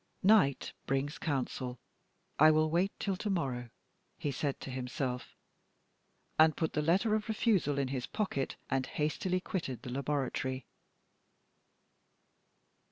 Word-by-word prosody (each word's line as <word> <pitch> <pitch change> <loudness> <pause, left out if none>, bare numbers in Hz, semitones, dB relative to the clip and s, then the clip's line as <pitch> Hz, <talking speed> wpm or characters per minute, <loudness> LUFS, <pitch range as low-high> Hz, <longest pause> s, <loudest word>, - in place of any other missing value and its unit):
"Night 190 -9 +4
brings 135 +2 -1
counsel; 130 -3 -2 0.6
I 155 +2 +9
will 155 0 +3
wait 180 +4 +2
till 195 -2 -1
to 210 - -3
morrow," 130 -10 -1 0.5
he 145 - -2
said 140 +1 -2
to 135 - -6
himself, 125 0 -3 1.0
and 155 -1 +6
put 160 - 0
the 150 - +1
letter 185 +8 +3
of 215 +1 0
refusal 210 - +2
in 135 -2 0
his 130 -2 -3
pocket, 190 -11 -2
and 130 0 0
hastily 180 +5 0
quitted 135 - -4
the 125 - -6
laboratory. 135 -1 -1
145 Hz, 125 wpm, -32 LUFS, 130-180 Hz, 1.0 s, I